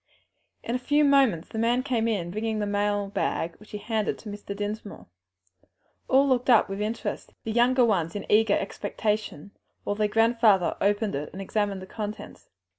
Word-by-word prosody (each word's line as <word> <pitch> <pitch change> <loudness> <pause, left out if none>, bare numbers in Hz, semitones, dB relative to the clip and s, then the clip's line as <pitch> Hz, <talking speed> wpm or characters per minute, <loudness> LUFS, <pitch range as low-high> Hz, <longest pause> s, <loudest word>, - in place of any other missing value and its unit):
In 235 - -3
a 250 - 0
few 290 +4 +2
moments 270 - +3
the 220 - -5
man 240 +3 +2
came 240 -4 0
in 185 -6 -1
bringing 220 +2 -2
the 210 - -1
mail 205 0 0
bag, 170 -4 -2
which 215 - -17
he 210 - -5
handed 215 0 -2
to 215 - -10
Mr. 205 0 -7
Dinsmore. 205 0 -5 1.0
All 270 +2 +4
looked 255 -1 +1
on 235 -3 +6
with 195 +1 -5
interest, 220 +2 -4
the 225 - -3
younger 245 +2 +4
ones 175 -7 0
in 205 - -4
eager 215 -1 +4
expectation, 210 -3 -3 0.3
while 205 - -2
their 210 0 +1
grandfather 225 -4 +3
opened 205 +1 +1
it 145 +2 -4
and 190 - -8
examined 195 -1 -2
the - - -7
contents. 210 +2 -7
210 Hz, 180 wpm, -26 LUFS, 205-230 Hz, 1.0 s, on